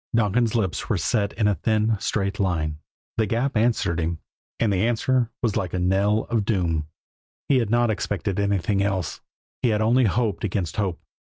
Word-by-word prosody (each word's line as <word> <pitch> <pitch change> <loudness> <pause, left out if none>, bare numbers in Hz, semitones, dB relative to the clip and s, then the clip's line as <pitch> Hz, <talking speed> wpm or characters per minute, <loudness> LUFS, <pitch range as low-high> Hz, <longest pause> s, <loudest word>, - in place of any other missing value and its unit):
Donkin's 115 +1 +2
lips 100 -6 -1
were 110 - +2
set 100 +5 0
in 110 -2 +1
a 105 - +3
thin, 110 +5 +1
straight 100 0 -1
line. 80 -6 -1 0.4
The 110 -1 +2
Gap 120 +6 0
answered 110 -7 +1
him; 85 0 -1 0.4
and 110 -3 +2
the 95 +4 +2
answer 120 +1 +1
was 115 -4 +1
like 95 -5 -1
the 90 - -3
knell 100 +4 +2
of 115 -3 +2
doom. 85 -7 0 0.6
He 135 -3 +4
had 115 -4 -1
not 120 0 +3
expected 100 -2 -2
anything 100 0 +1
else; 95 -3 -1 0.4
he 125 - +2
had 105 -1 +1
only 120 +3 +4
hoped 110 0 0
against 95 -5 -2
hope. 95 -5 -1
105 Hz, 180 wpm, -24 LUFS, 95-115 Hz, 0.6 s, He